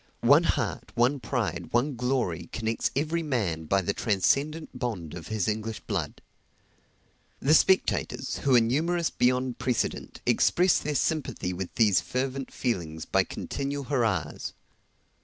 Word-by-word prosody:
One - - +6
heart, - - -1
one 125 +4 +2
pride, 95 - -2
one 130 +4 +2
glory, 125 -8 -1
connects 115 0 -1
every 160 +4 0
man 105 - -1
by 95 +4 +2
the 100 - 0
transcendent 140 - 0
bond 105 - -3
of 85 -2 -8
his 110 -4 -1
English 110 +1 -2
blood. 90 -9 -4 1.2
The 145 - +3
spectators, 190 +4 +2
who 135 -2 +3
are - - +8
numerous 160 +9 +1
beyond 125 0 +1
precedent, 125 -3 -2
express 180 0 +3
their 150 -1 -3
sympathy 140 - -1
with 90 0 -6
these 105 -6 +4
fervent 130 +5 -3
feelings 85 -10 -3
by - - +2
continual 140 0 -4
hurrahs. 115 - -1
120 Hz, 135 wpm, -27 LUFS, 95-140 Hz, 1.2 s, are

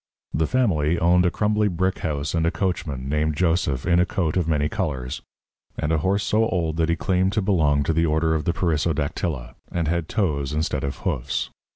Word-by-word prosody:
The 80 0 +1
family 85 - +1
owned 90 +2 +4
a - - +4
crumbly 105 +3 +1
brick 95 0 -1
house 75 -2 -2
and 80 -1 +1
a - - +4
coachman 80 -8 -2
named 75 +1 0
Joseph 80 -7 +1
in 85 0 +3
a 90 - +4
coat 80 -5 -1
of 90 -3 +1
many 75 -2 +1
colours, 75 -8 -3 0.6
and 75 - -1
a 80 - +2
horse 100 +5 +1
so 110 +3 +2
old 80 -4 -1
that 80 0 +1
he 85 - +2
claimed 95 +2 +1
to 105 - +1
belong 75 -7 +2
to 80 - 0
the 80 +1 +2
order 80 +1 +2
of 75 -2 -1
the - - +2
Perissodactyla, 75 -7 -1 0.2
and 85 -2 -1
had 85 0 -1
toes 75 - 0
instead 75 -2 -1
of 70 0 -3
hoofs. - - -1
80 Hz, 205 wpm, -23 LUFS, 75-90 Hz, 0.6 s, owned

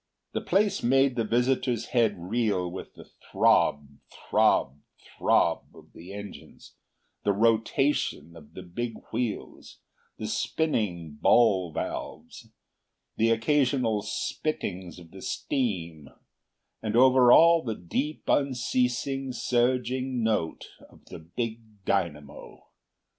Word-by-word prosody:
The - - -2
place 200 0 +1
made 135 +1 +3
the 115 - 0
visitor's 120 0 0
head 115 -4 +3
reel 95 -1 -1
with 95 - -9
the - - -13
throb, 70 -1 +1
throb, 65 +3 +1 0.2
throb - - +1
of - - -17
the 90 +3 -11
engines, 100 0 -10 0.5
the 100 - +2
rotation 115 - +1
of 75 -3 -15
the 95 - -8
big 115 +6 -5 0.2
wheels, 115 -2 -4 0.4
the - - -5
spinning 90 - -2
ball 95 -7 +4
valves, - - -6 0.7
the 115 +1 +3
occasional 120 -2 +1
spittings 95 - -4
of 85 -2 -14
the 95 - -12
steam, 85 - -3 0.7
and 110 0 -3
over 125 0 +6
all 170 +3 +7
the 115 -6 -4
deep, 135 - -3
unceasing, 130 0 0
surging 125 +1 0
note 105 -8 -1 0.2
of - - -21
the - - -8
big 110 +4 -7
dynamo. 75 -7 -3
115 Hz, 110 wpm, -27 LUFS, 90-125 Hz, 0.7 s, all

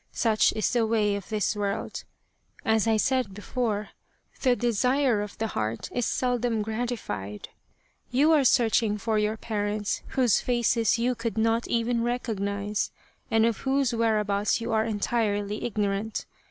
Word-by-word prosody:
Such 220 -2 +3
is 215 - 0
the 235 -2 +2
way 210 -2 +2
of 200 -2 -7
this 215 -1 0
world. 200 -1 -3 0.6
As 220 0 +2
I 220 -1 +3
said 250 -3 0
before, 210 -1 -2 0.5
the 255 -2 +4
desire 245 0 +2
of 205 -1 -6
the 225 - -1
heart 110 - -3
is 245 -2 0
seldom 245 -3 0
gratified. 220 - -4 0.6
You 285 +6 +3
are 300 -3 +5
searching 225 -4 +3
for 220 0 0
your 210 +1 0
parents 210 -1 -2 0.2
whose 250 -4 +4
faces 235 -2 +2
you 245 +2 +1
could 230 -3 -4
not 225 +1 +1
even 235 0 0
recognize, 210 -4 -2 0.4
and 225 0 +4
of 230 -3 +1
whose 270 -2 +1
whereabouts 210 -3 +1
you 230 +1 -4
are 220 0 +2
entirely 210 -1 -1
ignorant. 210 -1 -2
225 Hz, 145 wpm, -27 LUFS, 210-240 Hz, 0.6 s, are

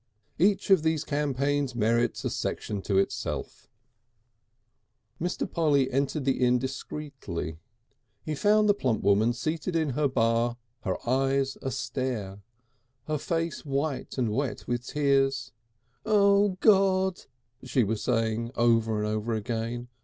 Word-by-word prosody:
Each 195 +3 +2
of 190 -4 +7
these 160 -1 0
campaigns 145 -2 -1
merits 115 +1 +1
a - - 0
section 105 -2 -3
to 95 0 0
itself. 95 - -2 1.5
Mr. 175 +2 -1
Polly 150 -5 +2
re 130 - -7
entered 140 +2 -1
the 135 -1 +1
inn 125 0 +4
discreetly. 130 - -5 0.6
He 155 - -3
found 210 +7 +3
the 205 - +6
plump 130 - -1
woman 100 +4 +4
seated 155 +7 -3
in 160 -3 +1
her 145 +3 +1
bar, 115 -1 +1 0.3
her 95 -1 0
eyes 135 +1 +1
a 135 - -2
stare, 115 -7 -3 0.6
her 155 -1 -2
face 165 +1 -2
white 140 -1 -2
and 120 -4 0
wet 135 0 -2
with 120 +1 -2
tears. 140 -2 +1 0.5
"O 200 -2 +3
God!" 190 -3 +3 0.4
she 130 -1 +1
was 110 +1 -2
saying 115 -1 0
over 115 -2 +2
and 105 - -1
over 110 +2 -1
again. 115 +2 -3
135 Hz, 135 wpm, -27 LUFS, 115-155 Hz, 1.5 s, of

